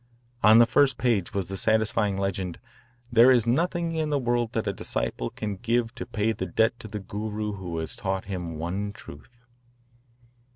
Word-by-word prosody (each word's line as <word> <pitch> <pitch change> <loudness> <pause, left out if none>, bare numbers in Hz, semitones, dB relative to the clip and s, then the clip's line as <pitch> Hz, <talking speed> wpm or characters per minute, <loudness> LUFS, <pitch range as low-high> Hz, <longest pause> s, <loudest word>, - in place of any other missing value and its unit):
On 110 +2 +7
the 120 - +8
first 130 +4 +3
page 115 -8 +1
was 95 -3 -2
the 95 - -5
satisfying 110 -2 +1
legend, 95 -3 -2 0.5
"There 120 +2 +7
is 125 -4 +4
nothing 170 +6 0
in 160 -1 -1
the 145 - +1
world 120 -3 0
that 115 - -1
a 100 - -1
disciple - - -3
can 105 -2 -5
give 115 +2 0
to 125 - -7
pay 105 +1 0
the 95 -3 -4
debt 110 +6 +1
to - - -8
the 105 0 -5
Guru 105 +2 -4
who 90 -4 -5
has 80 -1 -3
taught 95 -1 -3
him 90 -4 -5
one 95 +6 -3
truth." 120 +2 -13
110 Hz, 180 wpm, -26 LUFS, 95-120 Hz, 0.5 s, the